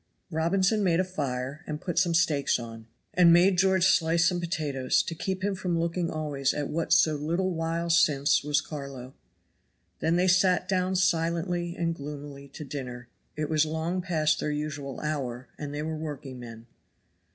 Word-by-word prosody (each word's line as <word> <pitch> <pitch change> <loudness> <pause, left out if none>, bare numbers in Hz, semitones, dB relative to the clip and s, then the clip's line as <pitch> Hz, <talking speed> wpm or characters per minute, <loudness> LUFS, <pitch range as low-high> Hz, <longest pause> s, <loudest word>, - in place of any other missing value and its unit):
Robinson 190 +6 +2
made 170 -3 +2
a - - +3
fire 140 -4 -4
and 150 -1 -4
put 175 0 -1
some 175 -2 +2
steaks 155 -4 +2
on, 115 -2 -9 0.3
and 175 -2 +6
made 180 +2 +5
George 190 -1 +4
slice 165 -2 +3
some 175 0 +1
potatoes 145 -6 0
to - - -4
keep 190 +3 -3
him 205 0 +1
from 180 -2 -2
looking 170 +1 -1
always 145 -3 -1
at 145 -1 -2
what 165 +1 -2
so 155 -1 +5
little 170 +6 -1
while 165 0 -2
since 145 -4 +3
was 145 0 +1
Carlo. 140 -4 -8 0.9
Then 165 +1 +1
they 180 +1 +2
sat 185 0 +3
down 185 0 0
silently 175 0 0
and 165 -1 0
gloomily 145 -2 -8
to 145 +2 -9
dinner, 125 -3 -7 0.3
it 150 0 -2
was 155 -1 +3
long 160 +4 -2
past 155 -4 +1
their - - -1
usual 150 -2 -4
hour 130 -5 -3
and 145 -1 -5
they 145 +1 -4
were 160 0 -3
workingmen. 130 -7 -7
160 Hz, 170 wpm, -27 LUFS, 145-175 Hz, 0.9 s, and